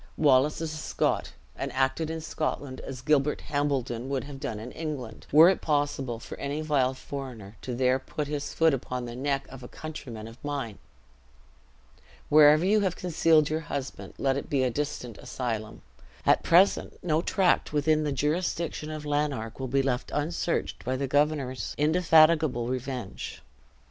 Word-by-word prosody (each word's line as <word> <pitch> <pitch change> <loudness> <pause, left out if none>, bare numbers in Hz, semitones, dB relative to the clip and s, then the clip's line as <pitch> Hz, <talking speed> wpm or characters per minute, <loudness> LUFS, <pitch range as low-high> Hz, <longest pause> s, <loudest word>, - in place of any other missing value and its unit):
Wallace 145 +1 +4
is 160 -1 -3
a - - -5
Scot, - - -1 0.2
and - - -4
acted 135 +4 0
in 160 0 -4
Scotland 145 -4 -3
as 130 -1 -7
Gilbert 150 0 +2
Hambledon 135 -4 -1
would 135 -2 -1
have 140 -1 -9
done 110 -5 -4
in 120 +3 -7
England, 140 -9 -6
were 155 +4 +9
it 190 - +2
possible 145 -5 -1
for - - -8
any 145 +2 -2
vile 135 -4 +1
foreigner 125 -7 -7
to 125 - -4
there 130 +1 +2
put 150 +3 -4
his 145 -1 -3
foot 160 -2 +3
upon 125 -1 -3
the 120 0 -7
neck 135 +1 -1
of 135 -1 -10
a 125 - -8
countryman 125 -9 -8
of 115 +2 -14
mine. 140 -8 -4 1.5
Wherever 150 +2 +7
you 210 +3 +4
have 190 -4 0
concealed 165 -3 +3
your 155 - +1
husband, 140 -2 -5
let 135 0 +1
it 140 - -5
be 135 -2 +2
a 125 - +1
distant 125 -4 -4
asylum. 115 -4 -4 0.4
At - - +5
present 180 +4 +4
no 160 -2 +2
tract 185 0 +2
within 155 +1 +2
the 150 - -1
jurisdiction 155 +2 -1
of 155 -1 -6
Lanark 145 -7 -1
will 130 - -3
be 135 +2 +1
left 130 -2 -1
unsearched 165 +3 -1
by 130 +2 -1
the 135 +1 -1
governor's 140 -2 0
indefatigable 155 -4 +4
revenge." 125 -4 -5
140 Hz, 165 wpm, -28 LUFS, 130-155 Hz, 1.5 s, were